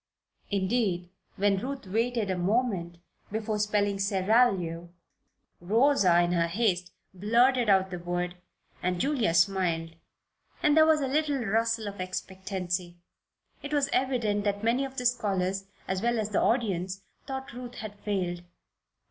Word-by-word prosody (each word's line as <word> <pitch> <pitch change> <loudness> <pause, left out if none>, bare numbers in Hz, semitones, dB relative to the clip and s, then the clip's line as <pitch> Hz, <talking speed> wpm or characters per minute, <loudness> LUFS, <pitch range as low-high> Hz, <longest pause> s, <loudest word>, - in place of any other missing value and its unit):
Indeed, 190 -3 0 0.2
when 200 0 +2
Ruth 270 +2 -5
waited 225 +1 0
a - - 0
moment 185 -2 0 0.3
before 215 0 -2
spelling 205 -1 +1
"seraglio," 195 -4 +2 0.7
Rosa 200 -2 +4
in 175 0 +1
her 170 -1 +2
haste 180 -2 0 0.2
blurted 235 +5 +3
out 190 -1 +3
the 180 - -4
word, 175 0 -3 0.5
and 180 0 -1
Julia 255 - +1
smiled 170 -2 +2 0.7
and 300 -1 +4
there 315 0 +6
was 310 -1 +4
a 270 - 0
little 285 -2 0
rustle 225 +1 0
of 200 -2 -6
expectancy. 185 -1 -4 0.6
It 285 +1 -3
was 285 -1 +2
evident 235 -6 +1
that 205 0 -1
many 245 +4 +2
of 265 0 -9
the 250 - -3
scholars, 195 -5 0 0.2
as 190 0 -1
well 240 +1 +1
as 215 -1 -1
the - - +2
audience, 195 -5 0 0.2
thought 265 -2 -5
Ruth 245 0 -8
had 205 -2 -8
failed. 180 -4 -2
205 Hz, 140 wpm, -28 LUFS, 185-240 Hz, 0.7 s, there